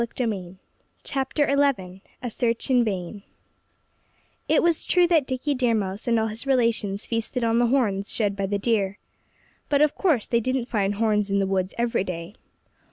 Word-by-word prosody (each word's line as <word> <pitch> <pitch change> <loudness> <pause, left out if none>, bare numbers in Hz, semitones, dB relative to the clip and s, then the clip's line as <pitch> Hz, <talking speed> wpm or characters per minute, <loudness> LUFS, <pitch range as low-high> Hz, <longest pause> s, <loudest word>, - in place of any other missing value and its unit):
XI 255 - 0
A 190 -5 -5 1.6
SEARCH 230 +2 -1
IN 250 -2 +5
VAIN 195 -1 -4 1.3
It - - +4
was 335 -2 +2
true 360 -1 +3
that 325 -6 +2
Dickie 265 +3 -1
Deer 250 -3 +1
Mouse 200 +2 -3
and 230 -1 +3
all 220 - +1
his 220 +4 -5
relations 230 -6 +1
feasted 230 +2 -2
on 230 0 +2
the 240 - +3
horns 215 -6 +1
shed 205 -3 0
by 195 -1 -2
the 205 +1 -1
deer. 200 -2 0 0.7
But 285 0 +4
of 300 - +2
course 310 - +1
they 235 - +1
didn't 255 +1 -1
find 205 -2 0
horns 210 -1 +1
in 200 - +1
the 195 - +2
woods 190 -1 -1
every 235 -4 0
day. 175 0 -6
225 Hz, 165 wpm, -24 LUFS, 200-250 Hz, 1.6 s, IN